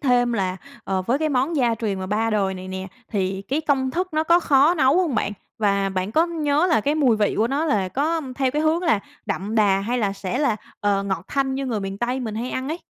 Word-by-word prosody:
thêm 245 -3 +2
là, 190 -4 -1 0.3
ờ, 190 -1 -1
với 240 +8 0
cái 310 0 0
món 280 +4 0
gia 240 -4 +2
truyền 210 -4 -2
mà 185 - -4
3 220 +3 0
đời 195 -3 +1
này 185 0 -8
nè 190 0 -5 0.2
thì 195 -2 -2
cái 275 +9 -1
công 270 -4 +1
thức 360 +6 -1
nó 310 - +2
có 340 +2 +5
khó 290 +1 +4
nấu 275 -2 +3
không 345 -8 +1
bạn? 210 -1 0 0.3
Và 200 -2 +1
bạn 190 +1 -3
có 325 +5 +3
nhớ 310 -1 +1
là 325 -10 +3
cái 285 +7 0
mùi 265 -7 +3
vị 210 -1 +1
của 220 - +3
nó 285 +4 0
là 205 - +1
có 315 - 0 0.2
theo 265 -2 +1
cái 300 +3 -1
hướng 320 +3 +2
là 310 - +2 0.3
đậm 205 +4 -3
đà 200 -3 +3
hay 240 +5 -1
là 205 -3 0
sẽ 195 +4 -4
là, 275 -7 +1 0.2
ờ, 200 -1 +1
ngọt 190 -3 -3
thanh 270 -1 0
như 270 0 -3
người 225 -5 -1
miền 195 0 -5
Tây 250 +2 -1
mình 220 -3 -4
hay 240 +3 -3
ăn 260 +1 -3
ấy. 320 +3 -3
240 Hz, 260 wpm, -23 LUFS, 200-290 Hz, 0.3 s, có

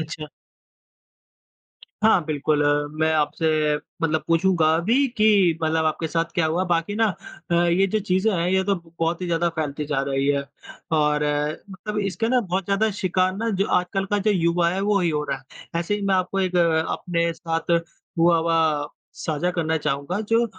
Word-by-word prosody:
अच्छा। 155 -1 -6 1.8
हाँ 205 -7 +4
बिल्कुल 150 0 0
अ, 145 0 +2
मैं 160 0 +3
आपसे 155 +2 0 0.5
मतलब 160 -1 +1
पूछूँगा 165 -1 +3
अभी 235 +11 +2
कि 200 -6 +4
मतलब 160 0 +1
आपके 160 +1 -1
साथ 165 +1 0
क्या 170 -3 +2
हुआ? 175 +4 0
बाकी 175 +3 0
ना 225 0 +3 0.4
अ, 170 - +2
ये 175 +3 +3
जो 215 +3 0
चीज़ें 190 +2 +1
हैं 170 -1 0
ये 190 0 +2
तो 200 0 +1 0.2
बहुत 165 +2 0
ही - - -2
ज़्यादा 170 0 +1
फैलती 150 -1 -2
जा 145 -2 0
रही 135 0 0
है। 140 -1 +1 0.6
और 150 0 +2 0.5
मतलब 210 +3 -5
इसके 195 +4 -2
ना 250 0 +3
बहुत 190 -2 -2
ज़्यादा 200 +3 +1
शिकार 185 +1 +1
ना 230 +2 -1
जो - - -1
आजकल 190 +2 -2
का 205 - +2
जो 210 +2 +1
युवा 170 -2 +2
है 190 +2 -2
वही 200 -4 +1
हो 150 -1 -1
रहा 135 - -1
है। 150 +5 -7
ऐसे 190 +5 -1
ही 205 - -4
मैं 195 - +3
आपको 185 +1 0
एक 185 -1 0 0.3
अपने 170 -1 -1
साथ 165 +1 -4 0.5
हुआ 170 0 +4
हुआ 160 -3 +1 0.3
साझा 160 +3 -2
करना 160 -2 -1
चाहूँगा। 150 +6 -2
जो 230 +1 +3
170 Hz, 180 wpm, -23 LUFS, 160-190 Hz, 1.8 s, हाँ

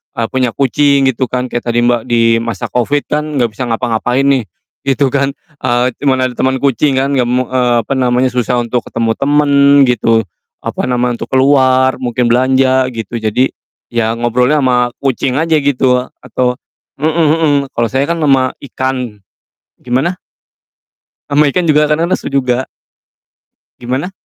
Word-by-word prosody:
eee, 115 -2 -1
punya 130 -3 -1
kucing 140 +1 +2
gitu 130 +1 -2
kan 125 0 -3
kayak 120 0 -4
tadi, 120 0 +1
Mbak, 120 -1 +2
di 115 -1 +3
masa 115 -4 -5
Covid 140 +4 0
kan 150 +1 -1
nggak 120 -4 +1
bisa 125 +2 -5
ngapa-ngapain 120 +2 -1
nih, 140 -3 +2 0.4
gitu 135 0 +1
kan, 140 0 0 0.2
eee, 120 -1 +1
cuman 135 -2 +1
ada 130 - -1
temen 130 +2 -1
kucing 140 +1 +2
kan, 135 +1 0
nggak 130 -3 +1
me 125 +1 +1
eee, 125 -1 0
apa - - -11
namanya, 125 -1 +1
susah 125 0 -1
untuk 120 +1 -3
ketemu 115 -1 -1
temen 145 +1 +2 0.3
gitu, 115 -2 +2 0.4
apa - - -3
nama, 125 0 0
untuk 120 - -5
keluar, 130 -1 +3
mungkin 120 -1 0
belanja, 130 +1 +2
gitu, 115 +1 -5
jadi, 110 +4 0 0.4
ya 115 -2 -1
ngobrolnya 125 +5 +1
sama 125 -2 +1
kucing 135 0 -1
aja 160 0 +1
gitu 130 -2 +2 0.2
atau 125 +1 -2 0.4
mhm 150 - +1 0.2
mhm, 160 -2 +2 0.2
kalau 120 0 0
saya 130 +3 0
kan 170 +3 -2
sama 135 -4 +2
ikan 130 -3 -4 0.7
gimana? 130 +8 0 1.1
Sama 145 0 +3
ikan 175 +3 0
juga 150 0 +3
kadang 165 +3 +1
lesu 175 - -2
juga. 130 -2 0 1.1
Gimana? 130 +9 -3
130 Hz, 160 wpm, -14 LUFS, 120-140 Hz, 1.1 s, di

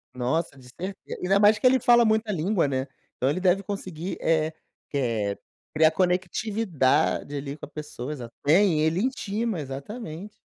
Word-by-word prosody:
Nossa, 135 +4 -1
de 125 -1 -15
certe 190 +8 -6 0.2
Ainda 195 +2 +3
mais 210 +1 +6
que 235 - -4
ele 260 0 +6
fala 240 -1 +5
muita 220 0 +1
língua, 175 -1 +1
né. 130 0 -2 0.3
Então, 130 - +1
ele 155 - 0
deve 190 +1 +2
conseguir 185 -3 -5
eh 160 -1 +2 0.4
que 140 - -2
eh 110 -6 -1 0.4
criar 155 0 +5
conectividade 180 -5 +1
ali 140 +1 -5
com - - -8
a - - -17
pessoa. 150 -3 -7
Exata 120 -4 -8 0.2
É, 175 +7 +6
ele 160 -1 +2
intima, 225 -5 -2
exatamente. 160 - -7
170 Hz, 165 wpm, -26 LUFS, 145-205 Hz, 0.4 s, mais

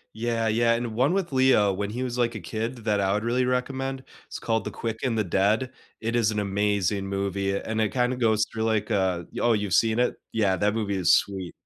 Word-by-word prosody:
Yeah, 115 0 -1
yeah. 115 +1 +3
And 115 -1 -2
one 130 +9 +2
with 190 -5 -1
Leo 130 -6 +4
when 100 +2 -3
he 125 +4 -3
was, 125 -1 -3
like, 120 -1 0
a - - -4
kid 110 +8 -4
th 115 - -13
that 105 -2 +2
I 95 0 +1
would 105 +1 -1
really 125 +2 +1
recommend, 130 +1 -2 0.2
it's - - -7
called 115 -1 -1
The - - -4
Quick 115 -1 -4
and 120 -4 0
the 110 - +2
Dead. 105 +8 +1 0.3
It 115 +2 -1
is 110 -2 +2
an 105 - -1
amazing 100 -1 0
movie 100 0 -1
a 100 - -2
and 110 0 -3
it 110 - 0
kinda 125 0 +1
goes 110 -3 +2
through 110 -1 -3
like, 110 -2 0
uh 95 -3 +1
y - - -6
oh, 120 -1 +4
you've 100 -4 -1
seen 115 +1 +3
it? 125 - +1 0.2
Yeah, 100 -4 +2
that 105 +3 +1
movie 100 -3 -1
is 90 - +5
sweet. 95 -3 -2
110 Hz, 245 wpm, -25 LUFS, 100-120 Hz, 0.3 s, is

